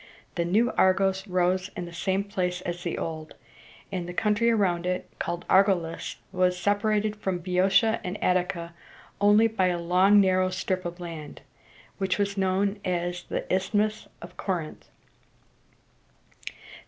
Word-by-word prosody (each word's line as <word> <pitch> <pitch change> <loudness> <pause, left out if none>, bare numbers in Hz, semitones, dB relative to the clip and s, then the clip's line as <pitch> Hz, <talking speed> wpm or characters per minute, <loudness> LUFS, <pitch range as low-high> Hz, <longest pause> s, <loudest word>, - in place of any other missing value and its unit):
The 170 - -1
new 220 +8 +2
Argos 190 +1 +2
rose 185 +1 +1
on 180 - -3
the 170 - -10
same 190 +3 0
place 180 -3 -2
as 175 -1 -5
the 170 -1 -3
old; 155 -1 -5 0.6
and 180 -2 -4
the 175 - -7
country 215 +3 +2
around 180 -6 +1
it, 180 0 -2
called 175 0 -4
Ar´go 195 -1 +5
lis, 165 0 -6 0.2
was 180 -1 +1
separated 205 +2 +1
from 190 -3 -2
Boeotia 190 +5 +2
and 180 +3 -4
Attica 180 -2 0 0.5
only 205 +2 +6
by 220 -5 +1
a 175 -1 0
long 185 +4 +4
narrow 185 -1 +3
strip 185 0 -2
of 175 +1 -5
land, 165 -5 -8 0.6
which 190 -1 0
was 200 -1 -1
known 195 +1 0
as 175 0 -2
the - - -3
Isthmus 210 +3 0 0.2
of 175 +1 -11
Cor´ 180 -5 -2
inth. - - -19
185 Hz, 150 wpm, -26 LUFS, 175-200 Hz, 0.6 s, only